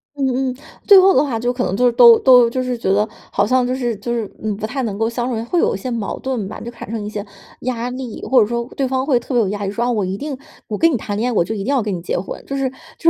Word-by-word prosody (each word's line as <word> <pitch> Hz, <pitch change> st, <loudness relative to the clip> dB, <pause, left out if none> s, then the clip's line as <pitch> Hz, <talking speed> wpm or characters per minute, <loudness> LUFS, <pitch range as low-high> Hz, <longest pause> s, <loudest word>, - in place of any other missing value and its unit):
嗯 265 Hz, -1 st, 0 dB
嗯， -, -, -8 dB, 0.3 s
最 400 Hz, -2 st, +9 dB
后 385 Hz, +1 st, +6 dB
的 270 Hz, -, +5 dB
话 245 Hz, -6 st, -2 dB
就 245 Hz, +2 st, 0 dB
可 250 Hz, 0 st, -2 dB
能 190 Hz, -, -1 dB
就 250 Hz, -, +3 dB
是 245 Hz, -, +5 dB
都 235 Hz, -1 st, +8 dB
都 250 Hz, -3 st, +6 dB
就 255 Hz, +2 st, -2 dB
是 250 Hz, -1 st, -2 dB
觉 210 Hz, -4 st, -1 dB
得 205 Hz, +2 st, +2 dB, 0.2 s
好 -, -, +2 dB
像 255 Hz, +2 st, +2 dB
就 255 Hz, -, -1 dB
是 240 Hz, -4 st, -2 dB
就 235 Hz, +4 st, -5 dB
是， 225 Hz, -4 st, -2 dB
嗯， 215 Hz, -1 st, -2 dB
不 215 Hz, -, -4 dB
太 265 Hz, +5 st, -3 dB
能 210 Hz, -5 st, -3 dB
够 225 Hz, -, +1 dB
相 240 Hz, +1 st, -2 dB
处， 225 Hz, -3 st, -2 dB
会 350 Hz, -, +1 dB
有 -, -, +2 dB
一 -, -, -3 dB
些 250 Hz, +6 st, -5 dB
矛 225 Hz, -4 st, -3 dB
盾 250 Hz, -7 st, -3 dB
吧。 215 Hz, -, -8 dB
就 235 Hz, -, -7 dB
产 230 Hz, -, -10 dB
生 220 Hz, -2 st, -4 dB
一 -, -, -4 dB
些 205 Hz, -1 st, -5 dB, 0.4 s
压 245 Hz, -1 st, -2 dB
力， 250 Hz, -3 st, -7 dB
或 260 Hz, -2 st, +4 dB
者 210 Hz, -, +2 dB
说 235 Hz, 0 st, -3 dB
对 270 Hz, -2 st, 0 dB
方 260 Hz, 0 st, -1 dB
会 270 Hz, -4 st, +3 dB
特 245 Hz, +2 st, -7 dB
别 240 Hz, -, +4 dB
有 200 Hz, -, -1 dB
压 205 Hz, 0 st, -4 dB
力， -, -, -1 dB
说： 235 Hz, +3 st, -1 dB
“啊， 245 Hz, -, +1 dB
我 215 Hz, -4 st, 0 dB
一 190 Hz, +1 st, -3 dB
定 285 Hz, +3 st, -4 dB, 0.3 s
我 215 Hz, -, -3 dB
跟 330 Hz, +7 st, +4 dB
你 255 Hz, -, +1 dB
谈 205 Hz, -1 st, -5 dB
恋 230 Hz, +4 st, 0 dB
爱， 245 Hz, -, -2 dB
我 190 Hz, -, +3 dB
就 220 Hz, -, -4 dB
一 210 Hz, -, -4 dB
定 -, -, -6 dB
要 270 Hz, -5 st, +1 dB
跟 210 Hz, -, -2 dB
你 170 Hz, -, -6 dB
结 175 Hz, -, -2 dB
婚。” 185 Hz, -, -6 dB
就 275 Hz, -, -3 dB
是 270 Hz, -1 st, 0 dB, 0.3 s
就 330 Hz, -, -3 dB
240 Hz, 355 characters per minute, -19 LUFS, 215-260 Hz, 0.4 s, 最